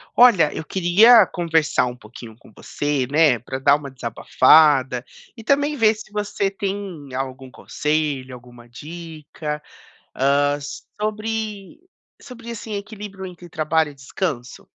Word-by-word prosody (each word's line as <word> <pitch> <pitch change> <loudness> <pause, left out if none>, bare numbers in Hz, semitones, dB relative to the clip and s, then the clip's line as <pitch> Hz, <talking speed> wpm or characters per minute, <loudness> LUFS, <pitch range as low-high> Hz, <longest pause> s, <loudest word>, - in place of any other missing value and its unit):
Olha, 225 -11 +6
eu 160 - -5
queria 195 +7 +6
conversar 165 -7 0
um 125 - -6
pouquinho 110 0 -12
com 120 - -20
você, 145 -3 -2
né, 150 -5 +4
pra 130 +4 -6
dar 140 +2 +4
uma 145 -1 -6
desabafada 130 +1 +3 0.3
e 225 - -11
também 285 +4 +1
ver 225 -4 +3
se 215 0 -12
você 205 -1 -2
tem 195 -6 -5
algum 130 0 -5
conselho, 145 -2 -2
alguma 120 -1 -15
dica, 155 +1 -7 0.5
ah, 145 +2 +2 0.4
sobre 215 -2 -4 0.4
sobre, 235 -3 -10
assim, 220 -1 -6
equilíbrio 200 -2 -8
entre 175 -1 -11
trabalho 155 0 0
e - - -17
descanso. 135 -2 -5
160 Hz, 130 wpm, -21 LUFS, 135-205 Hz, 0.5 s, Olha